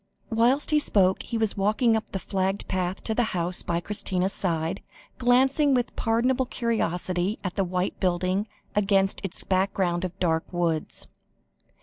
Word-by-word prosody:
Whilst 240 +7 +2
he 305 - +5
spoke 190 -9 +2
he 235 - -4
was 220 -2 +1
walking 215 +4 +2
up 220 - -3
the - - -2
flagged 190 +1 -2
path 185 0 -2
to 220 - -1
the 245 - +2 0.2
house 175 +1 +1
by 170 -1 -1
Christina's 190 0 -1
side, 170 -1 -1 0.4
glancing 265 +3 +3
with 245 -1 -1
pardonable 245 +3 +1
curiosity 185 -5 -1
at 185 -1 -4
the 195 - +1
white 180 +1 -2
building, 185 +3 0 0.3
against 195 -1 +2
its 190 -2 -3
background 185 -2 0
of 185 0 -4
dark 160 -2 0
woods. 170 -3 -2
195 Hz, 150 wpm, -26 LUFS, 180-225 Hz, 0.4 s, he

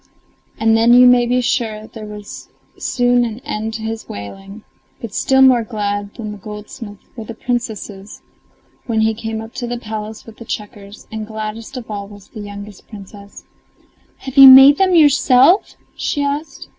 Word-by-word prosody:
And 225 0 +2
then, 230 +2 +4
you 250 0 +7
may 245 -1 +5
be 250 +1 +1
sure, 220 -3 -2
there 220 -1 -10
was 210 -1 -10 0.3
soon 245 -1 +1
an 225 -2 -4
end 220 -1 -5
to 220 - -6
his 225 0 -6
wailing. 195 - -9 0.4
But 230 -3 -8
still 265 +3 +3
more 255 -2 +5
glad 205 -2 -4
than 215 -3 -6
the 210 - -10
goldsmith 210 +1 -9 0.2
were 225 -3 -8
the 230 - -9
Princesses, 220 -5 -5 0.6
when 225 -2 0
he 220 0 +2
came 220 0 -5
up 225 +2 -11
to 245 -2 -5
the 240 0 -4
palace 220 -1 -7
with 225 -1 -14
the 230 - -11
checkers, 205 -1 -8
and 220 -1 -6
gladdest 220 +3 -7
of 230 -3 -8
all 200 -1 -5
was 205 -1 -15
the 220 - -11
youngest 205 -1 -10
Princess. 200 -1 -13 0.7
"Have 265 0 -10
you 275 0 +11
made 270 +2 +9
them 375 -2 +3
yourself?" 290 +2 +4 0.2
she 290 - -2
asked. 285 +3 -4
220 Hz, 175 wpm, -17 LUFS, 210-245 Hz, 0.7 s, you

